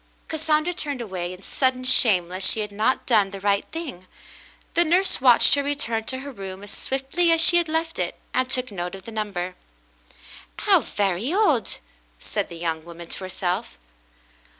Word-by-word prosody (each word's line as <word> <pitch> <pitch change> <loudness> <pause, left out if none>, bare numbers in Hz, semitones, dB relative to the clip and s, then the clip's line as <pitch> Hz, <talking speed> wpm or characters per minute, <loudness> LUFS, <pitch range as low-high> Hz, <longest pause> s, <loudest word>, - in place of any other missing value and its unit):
Cassandra 315 +2 +1
turned 290 -6 -4
away 185 -6 -4
in 185 +1 -11
sudden 255 +2 0
shame 215 -8 +4
lest 185 +2 -1
she 220 - +2
had 210 -1 -4
not 215 +6 0
done 210 -5 +3
the 195 0 -8
right 200 0 +1
thing. 275 - -7 0.7
The 340 - +7
nurse 350 -2 +3
watched 250 0 +6
her 285 - +3
return 255 -6 -1
to 260 +2 -1
her 280 +1 -7
room 195 -4 -8
as 205 - -10
swiftly 270 +6 0
as 330 - +4
she 340 +2 +6
had 340 -2 +1
left 325 +1 -2
it, - - -2 0.2
and 255 0 +1
took 255 -2 -1
note 180 -1 -4
of 190 - -11
the 230 - -9
number. 200 -5 -3 1.1
"How - - +6
very 200 - -1
odd 345 - +2 0.3
!" - - -36
said - - -3
the 170 - -8
young 165 -1 -2
woman 170 0 -11
to - - -2
herself. 180 - -3
225 Hz, 185 wpm, -24 LUFS, 185-285 Hz, 1.1 s, The